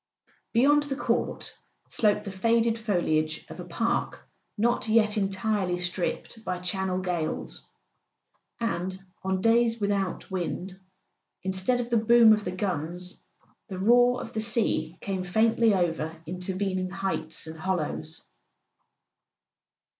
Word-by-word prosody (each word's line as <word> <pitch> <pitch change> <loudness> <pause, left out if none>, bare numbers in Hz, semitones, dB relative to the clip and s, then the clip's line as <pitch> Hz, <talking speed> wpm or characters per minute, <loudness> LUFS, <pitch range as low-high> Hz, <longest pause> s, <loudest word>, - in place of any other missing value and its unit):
Beyond 285 +5 +5
the 290 -2 -3
court - - -1 0.3
sloped 210 -1 +2
the 200 - -5
faded 230 +3 +2
foliage 155 -7 0
of - - -9
a - - -5
park 180 +7 -2 0.3
not 235 +2 +1
yet 215 -1 +4
entirely 195 -2 0
stripped 180 +5 -3
by 180 - -2
Channel 185 +1 -1
gales; 175 -4 -3 1.0
and 185 -5 -2 0.2
on 190 0 -1
days 230 +1 +3
without 200 -3 -1
wind, 185 +1 -4 0.6
instead 190 +6 +1
of 240 0 -4
the 235 - +4
boom 225 0 +7
of 210 -1 0
the 180 - -3
guns, 180 -1 -3 0.5
the 190 -4 -6
roar 245 +5 +4
of - - -8
the 220 - -1
sea 210 -7 +1
came 190 -2 -2
faintly 220 +3 +3
over 165 -3 -1
in¬ 180 +2 -5
tervening 185 0 -2
heights 195 -4 -3
and 160 0 -8
hollows. 160 -3 -3
195 Hz, 125 wpm, -27 LUFS, 180-225 Hz, 1.0 s, boom